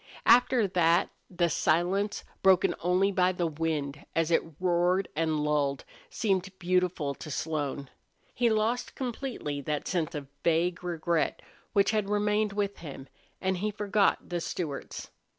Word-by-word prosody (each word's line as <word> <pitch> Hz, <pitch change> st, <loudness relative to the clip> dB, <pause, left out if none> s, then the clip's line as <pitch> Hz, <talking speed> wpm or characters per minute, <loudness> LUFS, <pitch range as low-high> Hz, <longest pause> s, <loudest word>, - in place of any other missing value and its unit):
After 245 Hz, -1 st, +5 dB
that 170 Hz, -2 st, +3 dB, 0.2 s
the 175 Hz, -1 st, +1 dB
silence, 180 Hz, +6 st, +1 dB, 0.2 s
broken 190 Hz, -2 st, +5 dB
only 185 Hz, +3 st, +2 dB
by 185 Hz, -1 st, +2 dB
the 180 Hz, -1 st, -1 dB
wind 150 Hz, -3 st, -2 dB
as 165 Hz, 0 st, +1 dB
it 165 Hz, -, +4 dB, 0.2 s
roared 180 Hz, +1 st, +2 dB
and 155 Hz, -1 st, 0 dB
lulled, 145 Hz, -2 st, 0 dB, 0.2 s
seemed 190 Hz, -4 st, 0 dB
beautiful 180 Hz, -5 st, 0 dB
to 155 Hz, -, -9 dB
Slone. 145 Hz, -1 st, -3 dB, 0.5 s
He 240 Hz, -1 st, +2 dB
lost 220 Hz, +3 st, 0 dB
completely 240 Hz, -, -4 dB
that 150 Hz, +1 st, -3 dB
sense 170 Hz, -5 st, -1 dB
of 145 Hz, -1 st, -4 dB, 0.2 s
vague 170 Hz, +1 st, +1 dB
regret 170 Hz, -2 st, -1 dB, 0.3 s
which 200 Hz, -1 st, +4 dB
had 210 Hz, -2 st, 0 dB
remained 210 Hz, 0 st, +1 dB
with 200 Hz, -1 st, -2 dB
him, 140 Hz, -4 st, -9 dB, 0.3 s
and 190 Hz, 0 st, 0 dB
he 210 Hz, +4 st, -1 dB
forgot 205 Hz, -1 st, +1 dB
the 175 Hz, -1 st, -3 dB
Stewarts. 155 Hz, -5 st, -5 dB
180 Hz, 140 wpm, -29 LUFS, 160-200 Hz, 0.5 s, After